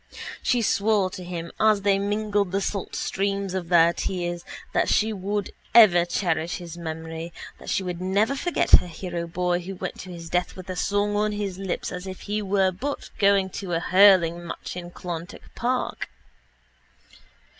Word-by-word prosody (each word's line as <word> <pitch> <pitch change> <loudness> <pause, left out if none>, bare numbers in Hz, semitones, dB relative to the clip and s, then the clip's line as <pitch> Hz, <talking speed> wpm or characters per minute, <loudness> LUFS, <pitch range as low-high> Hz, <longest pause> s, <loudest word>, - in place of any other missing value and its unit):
She 245 -2 +1
swore 200 -2 +2
to 185 - -7
him 170 -1 -6
as 215 -2 +4
they 200 -1 +3
mingled 205 -1 0
the 195 - +1
salt 200 0 -3
streams 195 -1 -1
of 180 -3 -3
their 170 -1 +5
tears 175 -2 -3 0.3
that - - +2
she 220 +1 +2
would 200 +1 -3 0.2
ever 185 -7 +8
cherish 170 -2 -1
his 170 -2 -8
memory, 160 0 -6 0.3
that - - -9
she 190 - 0
would 180 -1 -4
never 200 +7 +2
forget 350 +5 -1
her 180 - +8
hero 170 0 -5
boy 175 +1 0
who 190 +2 -7
went - - -5
to 185 - -8
his 170 -1 -8
death 180 +1 -1
with 185 0 -7
a - - -4
song 205 +2 0
on 210 0 +1
his 200 -3 -4
lips 195 -2 -3
as 180 +1 -6
if 190 0 -7
he 210 +1 -2
were 195 -1 +2
but 275 +11 -5
going 195 -2 +3
to 185 -2 -5
a 165 - +2
hurling 180 -2 +5
match - - -6
in 175 -1 -6
Clonturk 175 -1 -7
park. 250 +2 -2
185 Hz, 175 wpm, -25 LUFS, 175-205 Hz, 0.3 s, ever